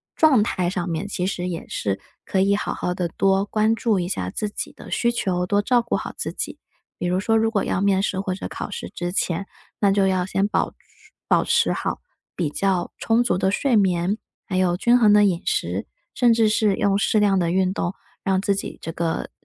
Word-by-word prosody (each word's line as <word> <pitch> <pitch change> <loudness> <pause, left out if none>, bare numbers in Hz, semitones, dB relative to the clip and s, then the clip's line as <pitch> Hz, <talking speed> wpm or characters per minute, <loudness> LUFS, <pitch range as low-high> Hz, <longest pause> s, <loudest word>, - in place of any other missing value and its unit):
状 295 -8 +5
态 180 -4 0
上 180 -2 -3
面， 165 +4 -2
其 185 -2 -2
实 180 -2 -3
也 165 - -5
是 100 -1 -2 0.3
可 190 - 0
以 200 +1 +3
好 - - -2
好 180 0 -2
的 175 -2 -2
多 195 +2 +2
关 215 +1 +1
注 225 -4 +1
一 175 - -2
下 90 - -2
自 210 - -3
己 - - -5
的 - - -13
需 235 0 +1
求， 180 -6 -1
多 205 +2 +2
照 240 +2 +3
顾 235 - -2
好 - - -6
自 - - -3
己。 - - -5 0.4
比 - - -2
如 180 +1 +1
说， 225 +2 +2
如 225 0 +2
果 205 -4 +1
要 - - 0
面 195 -1 +3
试 190 -1 -1
或 190 -2 -2
者 185 - -5
考 - - -6
试 - - -6
之 175 0 -4
前， 185 0 -1 0.4
那 200 - +4
就 195 -1 +3
要 185 -1 +1
先 195 +2 0
保 - - -1 0.5
保 - - +3
持 - - +2
好 - - -3 0.4
比 165 -5 -1
较 185 +2 0
充 230 +1 +2
足 240 - +1
的 190 0 +1
睡 255 +4 +1
眠， 190 -1 +2 0.3
还 185 -3 -2
有 180 -2 +2
均 240 +5 +4
衡 215 -4 +5
的 210 0 +6
饮 185 -2 0
食， - - -1 0.3
甚 240 -2 +4
至 225 -1 +3
是 210 -2 +2
用 200 0 +2
适 215 +1 +2
量 200 -2 +3
的 170 -2 +1
运 185 0 +2
动， 185 -2 -2 0.3
让 190 -1 +1
自 200 0 +1
己 200 - -6
这 165 - -5
个 165 0 -2
195 Hz, 245 characters per minute, -23 LUFS, 180-210 Hz, 0.5 s, 的